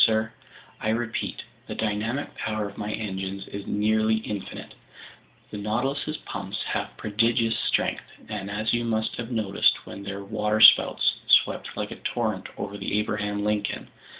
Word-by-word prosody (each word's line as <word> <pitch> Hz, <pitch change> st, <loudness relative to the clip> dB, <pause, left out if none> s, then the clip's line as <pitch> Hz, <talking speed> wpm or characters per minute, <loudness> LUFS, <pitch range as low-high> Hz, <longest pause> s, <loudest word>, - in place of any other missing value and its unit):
"Sir, 110 Hz, 0 st, 0 dB, 0.5 s
I 110 Hz, -, -1 dB
repeat: 115 Hz, 0 st, -2 dB, 0.2 s
the -, -, -5 dB
dynamic 110 Hz, +6 st, -2 dB
power 110 Hz, -1 st, -2 dB
of 100 Hz, -, -10 dB
my 105 Hz, 0 st, -4 dB
engines 95 Hz, -2 st, -4 dB
is 100 Hz, 0 st, -7 dB
nearly 110 Hz, +1 st, +2 dB
infinite. 105 Hz, -3 st, -5 dB, 0.8 s
The 105 Hz, -, -5 dB
Nautilus's 135 Hz, +8 st, -1 dB
pumps 100 Hz, 0 st, -4 dB
have -, -, -3 dB
prodigious 115 Hz, +2 st, +2 dB
strength, -, -, 0 dB, 0.2 s
as 105 Hz, +1 st, -2 dB
you 120 Hz, 0 st, +1 dB
must 110 Hz, -1 st, -1 dB
have 120 Hz, -1 st, -4 dB
noticed 110 Hz, -5 st, +2 dB
when 100 Hz, -, -8 dB
their 100 Hz, 0 st, -5 dB
waterspouts 105 Hz, +2 st, +6 dB
swept -, -, +4 dB
like -, -, -3 dB
a -, -, -7 dB
torrent -, -, -2 dB
over 100 Hz, 0 st, -5 dB
the -, -, -1 dB
Abraham 105 Hz, -1 st, -1 dB
Lincoln. 105 Hz, -1 st, -1 dB
105 Hz, 145 wpm, -26 LUFS, 100-110 Hz, 0.8 s, waterspouts